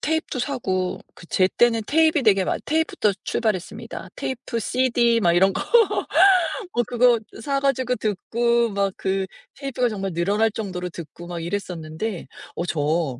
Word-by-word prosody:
테잎도 320 -3 -1
사고 190 -9 -2 0.2
그 175 - -14
제때는 225 +6 +2
테잎이 315 -1 +3
되게 195 -4 +4
많 - - -1
테입부터 315 -9 +1
출발했습니다. 210 -6 -3
테이프, 255 -2 -4
CD, 235 0 +2
막 175 -5 +3
이런 190 +3 +4
거. - - -3 1.1
어 240 - +2
그거 240 0 +3 0.2
사 275 +3 0
가지고 260 -2 +1
듣고 235 +3 0
막 200 0 0
그 190 0 -1 0.3
테이프가 270 -3 -1
정말 195 -3 -3
늘어날 205 +6 +1
정도로 185 -5 -4
듣고 170 0 -10
막 175 -1 -5
이랬었는데 175 0 -4 0.3
어 170 - -2
저 150 -5 -1
215 Hz, 305 characters per minute, -23 LUFS, 185-245 Hz, 1.1 s, 되게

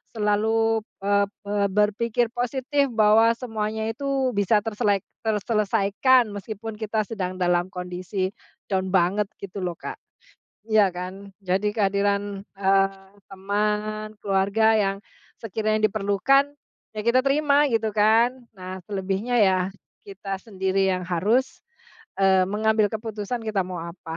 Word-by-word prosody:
selalu, 220 +1 +1 0.2
eee 200 0 +3 0.2
eee, 205 0 +1
berpikir 215 +4 +1
positif 265 +3 0
bahwa 220 +1 +5
semuanya 220 -2 -3
itu 270 +1 -1
bisa 205 +2 +3
terselek 205 -3 0 0.2
terselesaikan, 215 +3 +2
meskipun 215 +2 -6
kita 220 0 -1
sedang 185 -5 -4
dalam 175 -1 +1
kondisi 180 +1 -4 0.4
down 190 -1 0
banget, 190 +3 +2
gitu 200 0 -7
lo, 175 -2 -2
Kak. - - -7 0.7
Iya 215 -3 +4
kan? 185 +3 -7
Jadi 195 +3 0
kehadiran, 200 -1 0 0.2
eee, 195 0 +1 0.2
teman, 210 +2 -2
keluarga 200 +3 +2
yang 195 -2 +1 0.4
sekiranya 215 0 0
diperlukan, 215 +8 +2 0.4
ya 215 - -2
kita 245 +2 +4
terima, 290 +1 +3
gitu 225 -1 +1
kan. 230 +4 +3
Nah, 185 0 -7
selebihnya 195 +4 -2
ya, 190 -2 +4 0.5
kita 195 0 -5
sendiri 190 -2 0
yang 185 -1 -2
harus, 210 +9 0 0.6
eee, 190 -1 +5
mengambil 215 +1 +2
keputusan, 220 +1 -4
kita 210 -3 0
mau 180 -2 -5
apa. 170 -1 -8
210 Hz, 120 wpm, -24 LUFS, 195-225 Hz, 0.7 s, bahwa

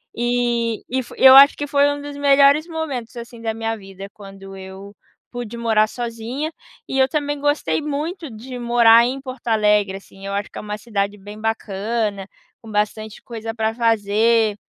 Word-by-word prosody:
E 240 -1 -1
e 260 +1 -1
fo 245 - -12
eu 265 0 +8
acho 275 +1 +8
que 290 - -3
foi 285 0 +2 0.2
dos 290 0 -8
melhores 280 +2 +4
momentos, 290 -9 -5
assim, 235 0 -9
da 225 -1 -2
minha 225 0 -2
vida, 195 -2 -10
quando 195 -1 -12
eu 190 +1 -11 0.4
pude 240 -2 -6
morar 220 -2 +2
sozinha. 240 +7 -5 0.3
E 270 - -2
eu 265 0 +4
também 290 0 -2
gostei 290 +2 0
muito 305 +3 -4
de 245 +3 -9
morar 235 -1 +5
em 255 +3 -2
Porto 260 -2 -10
Alegre, 210 -3 +2
assim, 195 0 -16
eu - - -4
acho 200 0 -2
que - - -8
é - - -6
uma 210 0 -5
cidade 205 -2 -3
bem 205 +2 -11
bacana, 215 -1 -2 0.3
com 225 - -11
bastante 210 +1 -2
coisa 225 -1 -6
pra 220 -1 -1
fazer. 225 -1 +2
230 Hz, 175 wpm, -20 LUFS, 210-260 Hz, 0.4 s, eu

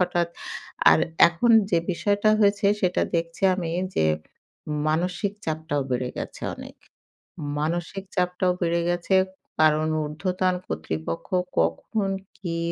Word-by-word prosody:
হঠাৎ 175 -1 +1 0.6
আর 80 - +6 0.3
এখন 170 +8 +1 0.2
যে 170 - +4
বিষয়টা 205 +4 +2
হয়েছে 200 -1 +3 0.2
সেটা 180 -1 +2
দেখছি 165 +3 -4
আমি 170 -3 -3 0.3
যে 80 - +3 0.8
মানসিক 180 +5 0
চাপটাও 155 -3 -1
বেড়ে 125 0 0
গেছে - - -6
অনেক। - - -10 0.8
মানসিক 175 +5 -2
চাপটাও 180 0 +1
বেড়ে 170 0 +1
গেছে 175 +2 +1 0.4
কারণ 155 0 +4 0.2
উর্ধ্বতন 180 +4 -1
কর্তৃপক্ষ 80 +1 -4 0.3
কখন 195 - 0 0.3
কি 170 -3 -4
170 Hz, 115 wpm, -25 LUFS, 155-185 Hz, 0.8 s, আর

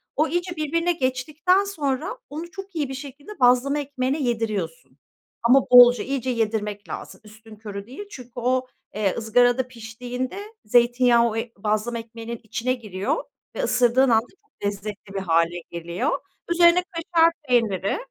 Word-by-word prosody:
O 305 +2 +2
iyice 350 +2 -2
birbirine 335 +3 0
geçtikten 310 +6 +1
sonra, 325 - -2
onu 325 +4 -7
çok 390 -1 -9
iyi 295 -4 -1
bir - - -5
şekilde 285 +8 -9
bazlama 255 +4 +4
ekmeğine 275 0 -2
yediriyorsun. 200 - -3 0.5
Ama 255 +3 +6
bolca, 245 0 +8
iyice 260 -1 -2
yedirmek 210 -3 -2
lazım, - - -7
üstünkörü 215 -2 -10
değil. 270 +11 -8
Çünkü 250 - -10
o, 255 +1 0 0.3
eee, 205 -3 0
ızgarada 245 +3 +3
piştiğinde, 250 - -6 0.2
zeytinyağı 240 +1 +4
o 215 - -5
ı - - 0 0.2
bazlama 215 +3 -1
ekmeğinin 230 0 -8
içine 225 +4 -1
giriyor 215 - -3 0.3
ve - - -2
ısırdığın 250 - +3
anda 225 0 +3 0.2
çok 425 - -11
lezzetli 200 0 -5
bir 195 - -2
hâle 170 0 +1
geliyor. 170 - -2 0.3
Üzerine 345 +1 +5
kaşar 335 -1 +3 0.2
peyniri 215 -6 +1
245 Hz, 145 wpm, -24 LUFS, 220-290 Hz, 0.5 s, bolca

